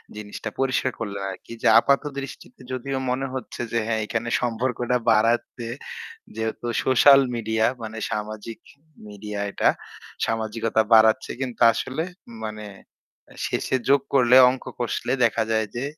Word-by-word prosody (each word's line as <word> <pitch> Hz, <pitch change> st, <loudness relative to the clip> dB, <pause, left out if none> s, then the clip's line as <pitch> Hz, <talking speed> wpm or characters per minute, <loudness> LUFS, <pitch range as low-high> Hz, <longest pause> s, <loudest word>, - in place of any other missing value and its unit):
জিনিসটা 105 Hz, +1 st, -6 dB
পরিষ্কার 130 Hz, -1 st, +1 dB
করলেন 100 Hz, -3 st, -4 dB
আরকি। 95 Hz, -, -12 dB
যে -, -, +4 dB
আপাত 140 Hz, 0 st, +2 dB, 0.2 s
দৃষ্টিতে 140 Hz, -, -10 dB
যদিও 130 Hz, +1 st, -3 dB
মনে 130 Hz, +2 st, -1 dB
হচ্ছে 130 Hz, -2 st, -6 dB
যে 115 Hz, -, 0 dB
হ্যাঁ 110 Hz, -1 st, 0 dB
এখানে 115 Hz, +2 st, -3 dB
সম্পর্কটা 125 Hz, +1 st, 0 dB
বাড়াতে 115 Hz, +2 st, +1 dB, 0.7 s
যেহেতু 110 Hz, +1 st, -4 dB, 0.2 s
সোশ্যাল 135 Hz, +2 st, +7 dB, 0.2 s
মিডিয়া 110 Hz, -1 st, 0 dB, 0.2 s
মানে 110 Hz, 0 st, -6 dB
সামাজিক 110 Hz, +1 st, -5 dB, 0.5 s
মিডিয়া 105 Hz, 0 st, -7 dB
এটা। -, -, +2 dB, 0.6 s
সামাজিকতা 110 Hz, 0 st, 0 dB
বাড়াচ্ছে 110 Hz, 0 st, +5 dB
কিন্তু 125 Hz, -3 st, -5 dB
আসলে 135 Hz, +8 st, -3 dB, 0.4 s
মানে 105 Hz, -1 st, -6 dB, 0.6 s
এ্যা -, -, -17 dB
শেষে -, -, -1 dB
যোগ 140 Hz, -1 st, +5 dB
করলে 125 Hz, -2 st, +5 dB
অঙ্ক 130 Hz, 0 st, -4 dB, 0.2 s
কষলে 120 Hz, -, -2 dB
দেখা 115 Hz, -1 st, +2 dB
যায় 110 Hz, -1 st, +2 dB
যে 120 Hz, -, -2 dB
115 Hz, 135 wpm, -24 LUFS, 110-130 Hz, 0.7 s, সোশ্যাল